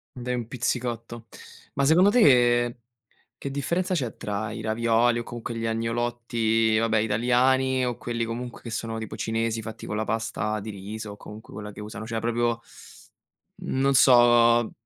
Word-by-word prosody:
Dai 125 0 -3
un 120 -2 -3
pizzicotto. 120 -2 -3 0.5
Ma 140 - +1
secondo 175 +7 +5
te, 120 - +4 0.6
che 140 - -5
differenza 170 +7 -1
c'è 125 - -2
tra 105 +1 -3
i 110 - -6
ravioli 115 +2 +2
o - - -3
comunque 120 0 -6
gli 115 - -3
agnolotti, 115 -1 0
vabbè 110 0 +2
italiani, 125 +4 +2
o 120 -1 -2
quelli 115 -1 -3
comunque 120 +1 -6
che - - -9
sono 115 0 -4
tipo 110 -1 -6
cinesi, 115 +1 -1
fatti 110 0 -8
con 105 - -3
la 110 - -1
pasta 110 -1 -2
di 105 - -8
riso, 105 +1 -7
o - - -11
comunque 105 +1 -12
quella 105 0 -7
che - - -10
usano, 105 0 -7
cioè 115 0 -3
proprio 120 0 0 1.0
mhmm, - - -4
non 135 +1 +3
so, 120 -2 +5
115 Hz, 165 wpm, -25 LUFS, 110-120 Hz, 1.0 s, secondo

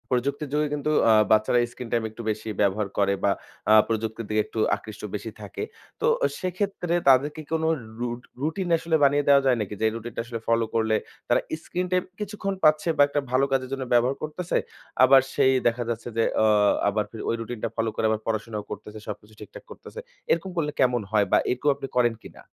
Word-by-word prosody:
প্রযুক্তির 140 +3 -1
যোগে 150 0 +2
কিন্তু 150 +1 -1 0.2
আ - - +7 0.2
বাচ্চারা 110 +3 +4
স্ক্রিন 125 -1 -8
টাইম 115 -1 +1
একটু 110 +2 -10
বেশি 110 +1 -3
ব্যবহার 100 +1 +1
করে 100 -1 +3
বা 100 - +4 0.4
আ - - +8
প্রযুক্তির 110 0 -3
দিকে 110 0 +2
একটু 115 - -6 0.2
আকৃষ্ট 110 -1 -11
বেশি 110 +2 -5
থাকে। 100 -3 -6 0.4
তো - - +1 0.3
সেক্ষেত্রে 185 -1 -2
তাদের 135 +2 +5
কি 155 - -7
কোন 160 0 0
রু 160 0 +2 0.2
রু 120 - -1 0.3
রুটিন 160 +5 -2
আসলে 165 0 0
বানিয়ে 145 +1 +3
দেওয়া 140 -1 +6
যায় 130 -2 +3
নাকি? 105 0 -4
যে - - -3
এই 110 - -1
রুটিন 115 0 -7
টা - - -1
আসলে 115 -1 -5
ফলো 115 0 +2
করলে 110 -1 +2 0.3
তারা - - +3 0.2
স্ক্রিন 180 +1 -3
টাইম 180 -1 +2 0.2
কিছুক্ষণ 205 -1 -3
পাচ্ছে 155 +2 +4
বা - - +5
একটা 145 0 -1
ভালো 130 +2 +3
কাজের 130 -1 0
জন্য 135 -1 -3
ব্যবহার 120 +3 +3
করতেছে। 160 +3 -2 0.5
আবার 135 +1 +8
সেই 130 - +4
দেখা 120 +1 0
যাচ্ছে 115 0 -4
যে 115 - +3 0.2
আ - - +5 0.4
আবার 105 +1 0
ফির 110 - -8
ওই - - +1
রুটিন 115 0 -6
টা - - 0
ফলো 115 0 0
করে - - 0
আবার 110 0 0
পড়াশোনাও 110 -1 -2
করতেছে। 105 +1 -8
সবকিছু 105 0 -8
ঠিকঠাক - - -11
করতেছে। 465 - -10 0.3
এরকম 170 +3 +1
করলে 150 -3 0
কেমন 125 -2 +3
হয় 105 -2 +3
বা - - +6
এরকমও 140 +3 +2
আপনি 135 0 -6
করেন 120 -2 +4
কিনা? - - -13
125 Hz, 210 wpm, -25 LUFS, 110-150 Hz, 0.5 s, আ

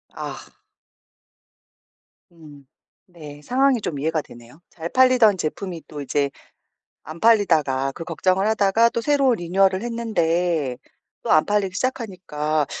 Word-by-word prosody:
아. - - -6 1.9
음. 150 -4 -16 0.4
네, 150 -5 -12
상황이 255 - +2
좀 145 -7 -4
이해가 160 +1 -1
되네요. 120 +7 -16
잘 165 0 -7
팔리던 255 -6 +4
제품이 170 +1 -5
또 150 -2 -8
이제 140 0 -1 0.7
안 160 +2 -10
팔리다가 160 -12 +2
그 165 +4 -9
걱정을 185 +4 0
하다가 220 +1 +3
또 235 - -3
새로 275 -2 +2
리뉴얼을 190 +1 +1
했는데 170 - -1 0.5
또 - - -5
안 155 - +5
팔리기 205 -3 0
시작하니까 180 - -2
175 Hz, 260 characters per minute, -22 LUFS, 150-220 Hz, 1.9 s, 안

